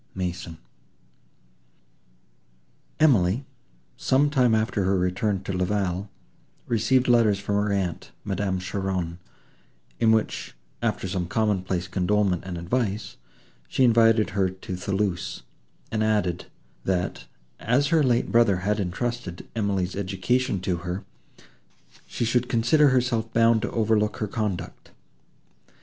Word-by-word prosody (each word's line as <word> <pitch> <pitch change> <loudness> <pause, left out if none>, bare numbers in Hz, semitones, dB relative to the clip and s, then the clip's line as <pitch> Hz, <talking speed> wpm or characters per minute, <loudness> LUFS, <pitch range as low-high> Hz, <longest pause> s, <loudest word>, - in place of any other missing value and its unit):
MASON 90 -2 -4 2.4
Emily, 125 - +3 0.5
some 145 +2 +2
time 125 -5 +3
after 110 -2 0
her 95 +1 +2
return 95 +2 0
to 95 - -4
La 90 0 0
Vallée, 95 0 -1 0.6
received 120 +3 +2
letters 115 -4 +4
from 100 +1 -3
her 105 0 +1
aunt, 95 -4 -2
Madame 95 -1 -1
Cheron, 95 -2 -3 0.8
in 110 - +4
which, 110 -1 -1 0.3
after - - -1
some 90 -2 -2
common 105 -2 +1
place 90 -1 -3
condolement 95 0 +1
and 90 -2 -5
advice, 105 +3 -2 0.5
she 130 - +1
invited 115 -3 +4
her 95 -1 +1
to 95 0 -7
Thoulouse, 95 -1 -2 0.5
and 110 -1 0
added, 105 -5 0 0.4
that, 90 -2 -2 0.3
as 130 +5 +1
her 165 -2 +4
late 125 -4 +1
brother 115 -5 +4
had 105 +1 +1
entrusted 100 0 -3
Emily's 100 -4 -1
education 100 +4 0
to 90 -1 -1
her, 90 +2 -5 1.0
she 120 - -2
should 125 +2 +1
consider 130 +5 +4
herself 120 -3 +1
bound 115 -1 +4
to - - -2
overlook 110 -2 +1
her 105 - -2
conduct. 105 -3 -4
105 Hz, 125 wpm, -25 LUFS, 95-115 Hz, 2.4 s, letters